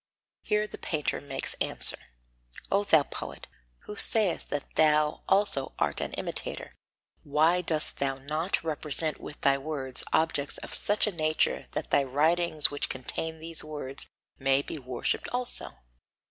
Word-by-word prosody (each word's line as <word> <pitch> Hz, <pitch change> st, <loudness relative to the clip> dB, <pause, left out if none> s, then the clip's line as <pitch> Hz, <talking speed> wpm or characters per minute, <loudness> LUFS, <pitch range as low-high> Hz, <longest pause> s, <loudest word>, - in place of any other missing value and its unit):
Here 210 Hz, 0 st, 0 dB
the 210 Hz, -, -10 dB
painter 155 Hz, -4 st, -2 dB
makes 135 Hz, -1 st, -1 dB
answer: -, -, 0 dB, 0.7 s
O 200 Hz, +1 st, +3 dB
thou 160 Hz, -7 st, +4 dB
poet, -, -, -7 dB, 0.4 s
who 210 Hz, -, -9 dB
sayest 205 Hz, -2 st, +1 dB
that 145 Hz, -, -5 dB
thou 150 Hz, -1 st, +3 dB
also 195 Hz, -8 st, +1 dB
art -, -, 0 dB
an -, -, -4 dB
imitator, -, -, -4 dB, 0.5 s
why 160 Hz, +5 st, +2 dB
dost 160 Hz, -3 st, +3 dB
thou 135 Hz, -1 st, 0 dB
not 155 Hz, +8 st, -2 dB
represent 155 Hz, 0 st, +2 dB
with 150 Hz, -, -9 dB
thy 140 Hz, 0 st, +3 dB
words 135 Hz, -3 st, -1 dB
objects 155 Hz, -3 st, +1 dB
of -, -, -8 dB
such 205 Hz, +1 st, +4 dB
a 210 Hz, -, -1 dB
nature 155 Hz, -3 st, 0 dB
that -, -, -4 dB
thy 140 Hz, -, +4 dB
writings 155 Hz, +3 st, +2 dB
which 145 Hz, -, -2 dB
contain 160 Hz, +5 st, -3 dB
these 165 Hz, +1 st, +4 dB
words 145 Hz, -3 st, -3 dB, 0.3 s
may 135 Hz, 0 st, +2 dB
be 155 Hz, -, -6 dB
worshipped 125 Hz, -2 st, -2 dB
also? 250 Hz, 0 st, 0 dB
155 Hz, 145 wpm, -28 LUFS, 140-170 Hz, 0.7 s, thou